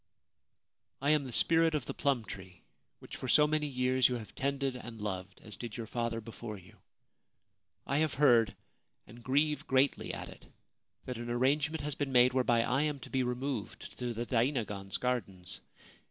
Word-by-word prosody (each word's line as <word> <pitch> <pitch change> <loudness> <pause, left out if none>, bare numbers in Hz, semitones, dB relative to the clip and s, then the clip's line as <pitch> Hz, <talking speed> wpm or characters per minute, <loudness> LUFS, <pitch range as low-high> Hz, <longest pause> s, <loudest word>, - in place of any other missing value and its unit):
* - - -54
I - - +6
am 150 -2 +3
the 130 - -6
Spirit 165 +5 +4
of 145 -5 -1
the - - -4
Plum 135 -6 0
Tree, 95 -4 -10 0.3
which - - -10
for 130 - -5
so 150 +4 +6
many 150 0 +1
years 130 -1 +3
you 125 - -1
have 110 -4 -7
tended 140 -1 -1
and 120 -2 -8
loved, 100 -2 -5
as 105 -2 -5
did 120 -2 -6
your 115 - -4
father 115 0 -2
before 115 -1 -7
you. 90 -1 -16 1.1
I 140 +2 +1
have 155 -3 +1
heard 120 -7 +5 0.3
— - - -49
and 120 +2 -14
grieve 145 +4 +1
greatly 135 +1 +2
at - - -6
it - - -13 0.3
— - - -45
that 125 -2 -5
an 120 0 -5
arrangement 140 +6 +1
has 150 0 -2
been 140 -1 -2
made 125 0 +6
whereby 120 -3 +3
I 130 +4 +1
am 150 -2 0
to - - -10
be 130 - +2
removed 125 -2 -3
to 125 -1 -2
the 120 +1 -3
dainagon's 115 -6 0
gardens. 100 -8 -2
125 Hz, 190 wpm, -32 LUFS, 115-140 Hz, 1.1 s, I